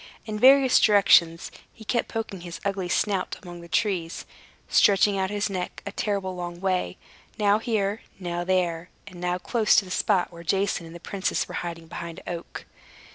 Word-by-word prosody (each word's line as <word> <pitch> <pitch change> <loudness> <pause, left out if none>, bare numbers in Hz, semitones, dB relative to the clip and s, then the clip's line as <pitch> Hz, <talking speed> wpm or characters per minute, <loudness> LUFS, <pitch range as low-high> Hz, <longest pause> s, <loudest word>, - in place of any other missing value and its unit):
In 215 -1 -4
various 265 +1 +6
directions 175 -5 +4 0.2
he 220 - -14
kept 235 +2 0
poking 220 -5 -5
his 170 -1 -8
ugly 195 -2 -2
snout 195 0 0
among 175 -1 -9
the 170 - -11
trees, 170 -3 -1 0.4
stretching 200 0 +4
out 190 -1 0
his 205 0 -1
neck 185 -3 -5
a - - -4
terrible 195 -3 -2
long 175 -1 -6
way, 185 -1 -1 0.4
now 210 -1 +3
here, 215 -3 -1 0.2
now 175 -2 -3
there, 175 -2 0 0.2
and 185 -3 -11
now 180 0 0
close 215 +4 +2
to 200 - +4
the 185 - -10
spot 185 -1 +1
where 170 - -10
Jason 195 -1 0
and 165 - -11
the - - -8
princess 195 +2 -2
were - - -9
hiding 170 -1 -6
behind 170 0 -7
an - - -3
oak. 170 - -9
190 Hz, 185 wpm, -25 LUFS, 175-205 Hz, 0.4 s, various